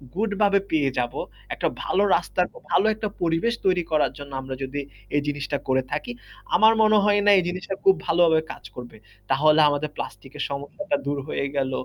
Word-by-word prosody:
Good 210 +1 0
ভাবে 200 -1 +4
পেয়ে 145 -4 +2
যাবো, 120 -1 -2 0.3
একটা - - -1 0.2
ভালো 200 +2 +1
রাস্তার 180 +1 0 0.3
ভালো 195 - +3
একটা 215 0 -4
পরিবেশ 170 +7 +1
তৈরি 180 -2 +3
করার 155 -1 +2
জন্য 140 -1 -10
আমরা 130 0 -6
যদি 140 +2 -3 0.3
এই 145 - +3
জিনিসটা 145 0 -2
করে 130 0 +2
থাকি। 150 +10 -3 0.4
আমার 220 +1 +6
মনে 215 0 +5
হয় 205 0 +3
না 205 - +7
এই 185 - +3
জিনিসটা 185 +2 -4
খুব 195 -1 +6
ভালোভাবে 165 -1 +4
কাজ - - -11
করবে। 120 -2 -9 0.3
তাহলে 155 +3 +4
আমাদের 145 +1 -2
প্লাস্টিকের 140 +2 -6
সমস্যাটা 145 - -3
দূর 145 0 -1
হয়ে 140 - -2
গেল। 135 -1 0
160 Hz, 180 wpm, -24 LUFS, 140-195 Hz, 0.4 s, না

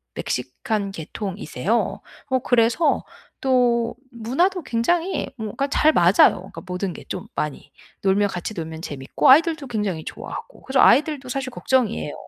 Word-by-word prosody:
멕시칸 200 - -3
계통이세요. 195 - -3 0.3
어 260 -1 +2
그래서 245 +6 +2 0.4
또 240 -3 +2 0.2
문화도 300 - 0
굉장히 330 +10 0
뭔가 220 +6 -3
잘 305 +2 +4
맞아요 175 +3 +5
그러니까 195 - -9
모든 180 0 -3
게 - - -10
좀 180 - -5
많이. 150 -2 -4 0.3
놀면 200 +1 +2
같이 175 +3 -5
놀면 160 -1 -6
재미있고 135 -4 0
아이들도 310 0 +5
굉장히 205 -9 -2
좋아하고. - - -8
그래서 265 0 0
아이들도 285 -1 +4
사실 260 0 -3
걱정이에요. 245 - 0
230 Hz, 340 characters per minute, -22 LUFS, 190-265 Hz, 0.4 s, 맞아요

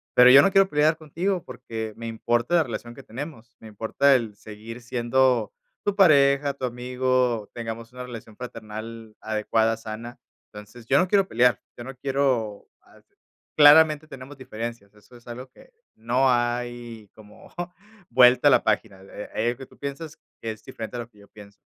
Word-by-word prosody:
Pero, 125 0 +8
yo 135 - +10
no 195 - +3
quiero 195 0 +5
pelear 155 0 +2
contigo 170 +4 -3
porque, 115 -3 -7
me 115 - -7
importa 120 +6 0
la 170 - +4
relación 120 -2 -7
que - - -12
tenemos, 120 -1 -9
me 110 - -12
importa 115 +6 +2
el 115 -5 -2
seguir 110 +4 -10
siendo 125 - +1 0.3
tu 205 -1 -1
pareja, 140 -6 +4
tu 135 -1 -5
amigo, 125 -2 -1
tengamos 115 0 -7
una 125 - -7
relación 115 -3 -10
fraternal 115 -2 -9
adecuada, 110 +1 0
sana. 115 +2 -8 0.3
Entonces, 105 +3 -12
yo 135 +4 +3
no 185 - +2
quiero 195 0 +2
pelear, 125 -2 +2 0.2
yo 120 - -8
no 135 0 -8
quiero, 130 -6 -1
ah, - - -22 0.6
claramente 155 +1 +6
tenemos 135 0 -11
diferencias, 115 -4 -7
eso 105 +4 -20
es 120 - -22
algo 125 +2 -8
que - - -20 0.2
no 125 +4 +1
hay 120 -2 -3
como 105 -1 -16 0.6
vuelta 130 +3 +6
a - - +4
la - - +4
página, 105 -2 -1
eh, 100 +1 -10
hay - - -1
algo 120 0 -1
que 135 - -9
tú - - -22
piensas 145 +2 -7 0.2
que 115 - -3
es 110 -1 -11
diferente 115 +2 -7
a - - -4
lo 120 - -7
que 105 -3 -24
yo 100 - -17
pienso. 100 -1 -15
120 Hz, 180 wpm, -24 LUFS, 110-135 Hz, 0.6 s, yo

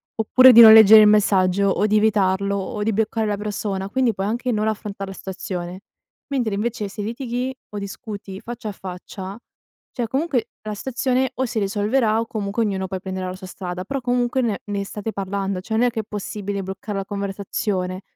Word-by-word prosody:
oppure 255 +4 +6
di 235 -1 +9
non 220 -1 +11
leggere 220 0 +9
il 210 - +7
messaggio 200 -2 +3
o 205 +2 +1
di 215 0 +3
evitarlo 200 -2 +2
o 200 +2 -4
di 215 +2 +1
bloccare 220 +1 0
la 205 -1 -1
persona, 200 -2 -3
quindi 250 +2 +1
puoi 195 - -2
anche 240 +4 -1
non 215 -1 0
affrontar 205 -2 -4
la 195 - -7
stazione. 185 -1 -6 0.5
Mentre, 240 -7 0
invece, 215 0 -2
se 205 +1 -6
litighi 245 +3 -3
o 210 - -7
discuti 200 -1 -7
faccia 235 -1 -6
a - - -3
faccia, 190 +1 -8 0.5
cioè 240 -2 -3
comunque 265 -2 -1 0.2
la 215 -1 -4
stazione 255 +3 -1
o 260 - 0
si 225 -2 -2
risolverà 215 +3 +1
o 230 - -1
comunque 210 +1 -2
ognuno 190 -2 -2
poi 190 0 -4
prenderà 185 0 -5
la 185 - -6
sua 185 -1 -10
strada, 180 -1 -6
però 275 -1 -3
comunque 245 +1 0
ne 225 -5 -1
ne 200 -1 -3
state 210 +2 -5
parlando, 195 -1 -3
cioè 220 +3 -4
non 230 - +3
è - - +2
che 225 -2 -2
è - - -13
possibile 205 -1 -4
bloccar 195 +2 -6
la 195 0 -3
conversazione, 195 -2 -3
210 Hz, 200 wpm, -22 LUFS, 195-225 Hz, 0.5 s, non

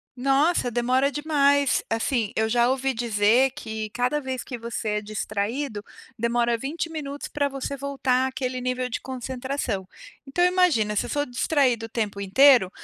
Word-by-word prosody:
Nossa, 275 +3 +2
demora 255 +4 +2
demais. 285 -2 +2
Assim, 225 -1 0
eu 220 0 +1
já 240 +1 +3
ouvi 265 0 0
dizer 230 +3 +3
que 220 -6 -6
cada 250 +5 0
vez 260 -2 -4
que 245 - -6
você 230 -1 -4
é 210 0 -1
distraído, 215 +3 -3 0.4
demora 235 +1 +1
20 300 +7 -4
minutos 290 -3 -5
para 285 -1 0
você 275 0 -5
voltar 265 -2 0
àquele 255 -1 -3
nível 255 0 -2
de 230 - -3
concentração. 255 -5 -4 0.4
Então 350 +6 +1
imagina 355 - +3
se - - 0
eu - - -7
sou 290 0 0
distraído 250 -2 +1
o - - -10
tempo 210 -3 -3
inteiro, 210 +1 +5
255 Hz, 160 wpm, -25 LUFS, 225-280 Hz, 0.4 s, inteiro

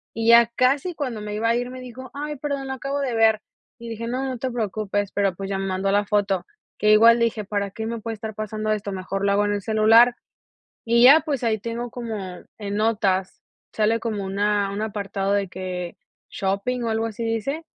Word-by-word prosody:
y 225 0 -1
ya 235 0 +8
casi 275 +7 +2
cuando 250 -8 -4
me 210 0 -5
iba 230 +2 0
a 230 - +3
ir 245 +1 -2
me 255 0 -8
dijo: 255 +1 -9
"Ay, 295 +1 -4
perdón, 280 -1 -3
lo 265 - -3
acabo 275 +2 -3
de 265 -3 -1
ver", 220 -1 +4 0.4
y 235 - -8
dije: 230 +1 -5
"No, 255 +3 -2
no 260 -2 -3
te 260 +1 -2
preocupes", 205 -3 -2
pero, 195 -3 0
pues, 195 +1 -6
ya 195 - -1
me 195 - -2
mandó 190 +1 0
la 205 0 +2
foto, 200 -3 0 0.3
que 210 +1 +4
igual 230 +2 +7
dije: 230 -2 0
"Para 200 -1 -2
qué 220 +1 -5
me 230 0 -4
puede 225 +1 -4
estar 220 0 -6
pasando 215 0 -3
esto, 205 -1 -2
mejor 195 +1 -3
lo 200 - +3
hago 205 +1 +2
en 205 - 0
el 205 - -2
celular", 225 +3 +5 0.7
y 235 +1 +4
ya 290 +5 +9
pues, 280 -6 -3
ahí 220 -1 +1
tengo 235 +2 -4
como 215 -7 -6 0.2
en 205 -1 -4
notas, 200 -4 0 0.3
sale 220 +1 +2
como 215 -4 -3
una 200 +1 0
un 205 +2 -3
apartado 200 -2 -2
de 200 -2 +1
que: 180 -1 -5 0.3
"Shopping", 200 +6 -2
o 230 - -1
algo 225 +1 0
así 225 +1 -5
dice, 225 +8 -2
220 Hz, 220 wpm, -23 LUFS, 200-235 Hz, 0.7 s, ya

